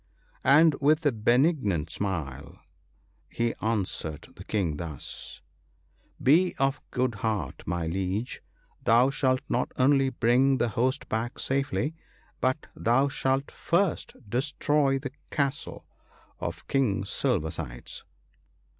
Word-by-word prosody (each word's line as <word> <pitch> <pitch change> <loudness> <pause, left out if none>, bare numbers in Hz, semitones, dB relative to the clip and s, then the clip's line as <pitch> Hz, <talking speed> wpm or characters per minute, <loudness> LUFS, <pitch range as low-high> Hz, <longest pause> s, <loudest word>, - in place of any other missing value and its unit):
" - - -34 0.2
And 160 -1 +6
with 155 +3 +3
a 145 - +5
benignant 115 - +2
smile, 80 -9 -4 0.7
he 115 0 -1
answered 95 -8 -2
the - - -10
King 90 -8 -1
thus, 80 -5 -6 0.8
"Be 170 +8 +4
of 135 +1 +1
good 125 -1 0
heart, 110 -2 -2
my 85 -1 -1
Liege; 95 +6 -2 0.4
thou 120 +5 +5
shalt 130 -2 +1
not 125 - 0
only 135 +1 +4
bring 130 +2 +3
the 120 - +1
host 130 +5 0
back 115 +3 -2
safely, 135 0 -1 0.5
but 130 +4 0
thou 130 +5 +2
shalt 135 0 0
first 175 0 0
destroy 140 +3 +1
the 135 -1 -5 0.2
castle 140 -2 -2 0.5
of - - -5
King 105 -8 +1
Silver 100 - 0
sides." - - -7
125 Hz, 120 wpm, -27 LUFS, 100-135 Hz, 0.8 s, And